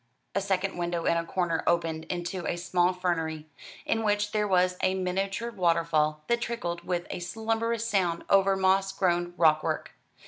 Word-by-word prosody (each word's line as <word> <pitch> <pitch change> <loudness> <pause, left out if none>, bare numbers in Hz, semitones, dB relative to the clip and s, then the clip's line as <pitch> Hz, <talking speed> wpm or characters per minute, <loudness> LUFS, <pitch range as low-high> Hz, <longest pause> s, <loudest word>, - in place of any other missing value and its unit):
A 200 - 0
second 195 -1 -1
window 175 -1 -2
in - - +3
a 170 - 0
corner 170 -1 -1
opened 165 -2 +1
into 175 0 -4
a - - 0
small 175 +1 +1
fernery, 165 -4 -2 0.4
in 225 - 0
which 210 -1 +1
there 210 -1 +1
was 185 -1 +3
a 185 - +2
miniature 195 +5 -2
water 170 -5 +2
fall 155 -1 +1
that 235 0 +1
trickled 175 -8 -3
with 175 -1 -2
a - - -4
slumberous 225 +4 -1
sound 180 -6 0
over 195 0 +4
moss 190 +1 +2
grown 175 -2 0
rockwork. 155 -2 +2
180 Hz, 170 wpm, -28 LUFS, 170-195 Hz, 0.4 s, over